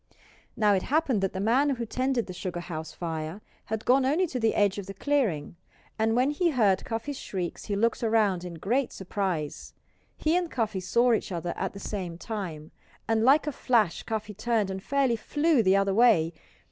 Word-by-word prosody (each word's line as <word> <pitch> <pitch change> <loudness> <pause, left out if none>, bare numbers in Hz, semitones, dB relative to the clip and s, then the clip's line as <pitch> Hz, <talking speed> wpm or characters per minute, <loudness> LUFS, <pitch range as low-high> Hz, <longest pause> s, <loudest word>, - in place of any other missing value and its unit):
Now 210 -2 +4
it 190 - +2
happened 275 - +1
that 195 - 0
the 190 - -4
man 245 +8 +3
who 235 -1 -4
tended 255 +1 0
the 185 - -7
sugar 180 -1 -4
house 160 -2 -6
fire 160 +1 -5 0.3
had 220 0 -4
gone 260 +2 +4
only 300 +8 +2
to 265 -7 -4
the 225 -1 +1
edge 205 -1 +2
of 195 - -7
the 195 - -7
clearing; 200 - 0 0.4
and 225 +1 +2
when 255 +4 +3
he 340 +4 +1
heard 210 - +2
Cuffy's 235 +5 -4
shrieks 180 -3 -5
he 205 - -2
looked 230 +3 +1
around 215 -5 +2
in 175 -2 -7
great 240 - 0
surprise. 185 -6 -4 0.4
He 315 +2 +1
and 355 -1 0
Cuffy 220 -8 -1
saw 235 +6 +3
each 220 - -1
other 175 -1 -3
at - - -3
the 200 - -8
same 185 -5 -5
time. 175 -8 -6 0.4
And 225 0 +2
like 275 +5 +5
a 300 - -1
flash 230 - +1
Cuffy 215 -1 -4
turned 215 -1 0
and 190 0 -5
fairly 270 +1 +1
flew 295 +3 +2
the 190 -2 +4
other 195 0 +2
way. 195 -8 +4
215 Hz, 195 wpm, -27 LUFS, 185-250 Hz, 0.4 s, like